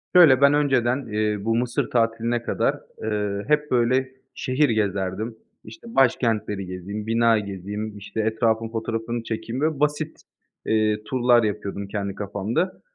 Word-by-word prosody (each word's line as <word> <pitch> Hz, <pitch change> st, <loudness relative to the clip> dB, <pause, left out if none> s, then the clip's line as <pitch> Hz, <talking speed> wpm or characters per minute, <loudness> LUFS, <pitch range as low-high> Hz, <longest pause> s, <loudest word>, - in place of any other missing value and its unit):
Şöyle, 150 Hz, -7 st, +8 dB
ben 140 Hz, +1 st, +6 dB
önceden, 135 Hz, -3 st, +2 dB
eee, 105 Hz, 0 st, 0 dB
bu 115 Hz, 0 st, +2 dB
Mısır 120 Hz, +1 st, 0 dB
tatiline 115 Hz, 0 st, 0 dB
kadar, -, -, 0 dB, 0.2 s
eee, 105 Hz, -2 st, -1 dB
hep, 150 Hz, 0 st, +1 dB
böyle, 130 Hz, +2 st, +2 dB, 0.2 s
şehir 135 Hz, +3 st, +1 dB
gezerdim. 105 Hz, +1 st, -1 dB, 0.3 s
İşte, 235 Hz, -8 st, -12 dB
başkentleri 110 Hz, -6 st, +2 dB
gezeyim, 95 Hz, +4 st, -6 dB
bina 115 Hz, 0 st, +3 dB
gezeyim, 105 Hz, +2 st, -5 dB
işte, 105 Hz, +2 st, -7 dB
etrafın 110 Hz, 0 st, +1 dB
fotoğrafını 115 Hz, +1 st, -3 dB
çekeyim, 115 Hz, +3 st, -4 dB
böyle 155 Hz, -2 st, 0 dB
basit, 150 Hz, +1 st, 0 dB, 0.5 s
ııı, 105 Hz, -1 st, +1 dB
turlar 120 Hz, 0 st, +3 dB
yapıyordum 100 Hz, -1 st, -3 dB
kendi 100 Hz, -1 st, -3 dB
kafamda. 105 Hz, -, -2 dB
115 Hz, 135 wpm, -24 LUFS, 105-130 Hz, 0.5 s, Şöyle